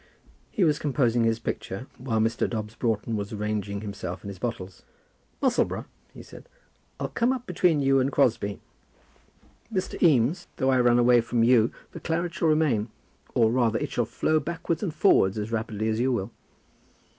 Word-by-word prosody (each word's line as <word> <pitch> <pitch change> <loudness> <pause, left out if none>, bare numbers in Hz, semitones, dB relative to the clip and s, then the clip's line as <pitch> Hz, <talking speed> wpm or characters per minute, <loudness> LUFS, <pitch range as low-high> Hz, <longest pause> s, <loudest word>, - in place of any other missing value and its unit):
He 210 - 0
was 150 -3 +2
composing 125 -5 +1
his 115 -1 +2
picture, 115 -1 -5
while 120 -3 -2
Mr. 115 +1 +1
Dobbs 110 -2 -4
Broughton 115 -1 -1
was 100 -1 -4
arranging 105 -1 -3
himself 100 -4 -6
and 100 - -6
his 95 -2 -9
bottles. 95 -6 -5 0.6
"Musselboro," - - +1 0.3
he - - -12
said, - - -14 0.5
"I'll 135 - -3
come 235 - +1
up 255 -2 -3
between 175 -4 +2
you 135 0 +4
and 130 +2 +1
Crosbie. 115 -8 +1 1.1
Mr. 185 -3 -3
Eames, 150 - +3
though 135 -1 +1
I 130 - +3
run 120 -1 +4
away 120 0 +5
from 115 0 0
you, 115 -1 +4 0.2
the - - -8
claret 170 +1 -2
shall 165 - 0
remain; 145 -9 +2 0.5
or, 115 -2 +4
rather, 120 -3 +2
it - - -4
shall - - 0
flow 155 0 0
backwards 165 0 -3
and 195 - -2
forwards 150 - +3
as 105 +1 -4
rapidly 110 -1 -2
as 110 0 0
you 130 +2 +2
will." 100 -6 -2
120 Hz, 175 wpm, -26 LUFS, 110-150 Hz, 1.1 s, away